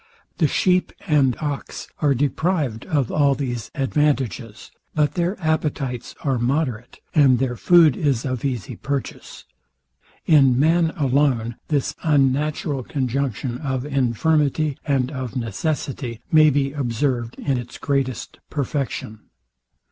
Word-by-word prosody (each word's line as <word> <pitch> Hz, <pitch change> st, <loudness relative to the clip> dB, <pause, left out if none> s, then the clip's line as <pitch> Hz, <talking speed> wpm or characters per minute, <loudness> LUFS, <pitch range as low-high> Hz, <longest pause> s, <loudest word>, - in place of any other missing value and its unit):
The 160 Hz, -, +4 dB
sheep 180 Hz, +5 st, +2 dB
and 140 Hz, -, +3 dB
ox 145 Hz, -2 st, -4 dB
are 145 Hz, -3 st, +2 dB
deprived 145 Hz, -2 st, -1 dB
of 145 Hz, -8 st, 0 dB
all 140 Hz, -2 st, +3 dB
these 120 Hz, -5 st, -4 dB
advantages; 135 Hz, -, -1 dB, 0.2 s
but 150 Hz, -1 st, +2 dB
their 180 Hz, +3 st, -1 dB
appetites 150 Hz, -6 st, -2 dB
are 135 Hz, -4 st, 0 dB
moderate, 125 Hz, -2 st, -2 dB
and 135 Hz, -5 st, +5 dB
their 125 Hz, -1 st, -1 dB
food 165 Hz, 0 st, +5 dB
is 140 Hz, -5 st, 0 dB
of 130 Hz, -3 st, -3 dB
easy 125 Hz, -9 st, -3 dB
purchase. 140 Hz, -2 st, -5 dB, 0.8 s
In 135 Hz, -5 st, +5 dB
man 165 Hz, +3 st, +3 dB
alone, 130 Hz, -5 st, +1 dB
this 145 Hz, -4 st, 0 dB
unnatural 145 Hz, -1 st, +1 dB
conjunction 130 Hz, -1 st, -2 dB
of 130 Hz, -3 st, -3 dB
infirmity, 145 Hz, +2 st, +1 dB
and 135 Hz, -3 st, +1 dB
of 130 Hz, -3 st, -5 dB
necessity, 125 Hz, +1 st, -3 dB
may 155 Hz, -1 st, +7 dB
be 140 Hz, -1 st, +1 dB
observed 120 Hz, -3 st, -1 dB
in 135 Hz, -3 st, -1 dB
its 120 Hz, 0 st, -8 dB
greatest 135 Hz, -3 st, -2 dB
perfection. 135 Hz, -6 st, -3 dB
140 Hz, 120 wpm, -22 LUFS, 125-150 Hz, 0.8 s, may